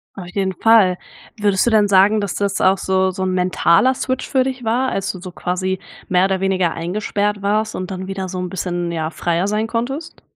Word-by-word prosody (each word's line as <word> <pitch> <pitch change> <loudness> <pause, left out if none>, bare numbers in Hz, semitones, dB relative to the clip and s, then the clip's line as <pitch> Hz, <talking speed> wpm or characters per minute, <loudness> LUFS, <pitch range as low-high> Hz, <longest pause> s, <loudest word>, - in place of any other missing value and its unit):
Auf 185 -3 -8
jeden 190 -1 -1
Fall. 195 -2 +4 0.4
Würdest 200 -2 +2
du - - +3
denn 215 -2 +4
sagen, 200 +2 +4
dass 200 -2 -3
das 200 -1 -1
auch 190 +1 +4
so 190 0 +1
so 185 +1 -4
'n 185 - 0
mentaler 180 +5 +3
Switch 260 0 -3
für 265 -2 +2
dich 260 -1 -4
war, 245 +4 +1
als 195 -3 -2
du 185 - -10
so 185 0 -8
quasi 185 +1 -2 0.3
mehr 180 0 +3
oder 190 -1 -1
weniger 185 -3 +1
eingesperrt 205 +4 -2
warst 215 +2 0
und 185 +1 -5
dann 190 0 -5
wieder 195 -1 -4
so 185 0 -6
'n 180 -1 -3
bisschen, 175 -1 -3
ja, 160 -1 -2
freier 170 +3 -1
sein 215 +2 -1
konntest? 255 +8 -4
190 Hz, 215 wpm, -19 LUFS, 185-215 Hz, 0.4 s, Fall